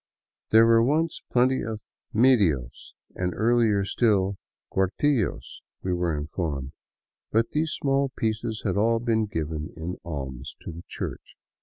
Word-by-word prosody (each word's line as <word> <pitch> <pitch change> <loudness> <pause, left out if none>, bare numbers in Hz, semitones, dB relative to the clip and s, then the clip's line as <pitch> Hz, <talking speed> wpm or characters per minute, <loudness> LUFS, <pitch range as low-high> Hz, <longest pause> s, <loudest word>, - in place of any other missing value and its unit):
There 110 +1 +7
were 115 0 +6
once 155 +7 +1
plenty 130 +1 +3
of 110 -1 -4 0.3
medios 100 - +2 0.2
and, 90 -1 -2
earlier 110 -3 +3
still, 100 -3 +2 0.4
cuartillos, 105 +5 0 0.2
we 95 - 0
were 85 -3 0
informed; 75 -3 -3 0.6
but 115 +1 +2
these 155 +1 0
small 135 0 +1
pieces 110 -2 -2
had 95 -2 0
all 115 +3 +3
been 115 -2 +1
given 80 -4 -4
in 85 +3 -4
alms 70 -4 -6
to - - -7
the 85 +1 -9
Church. - - -6
105 Hz, 135 wpm, -26 LUFS, 85-115 Hz, 0.6 s, There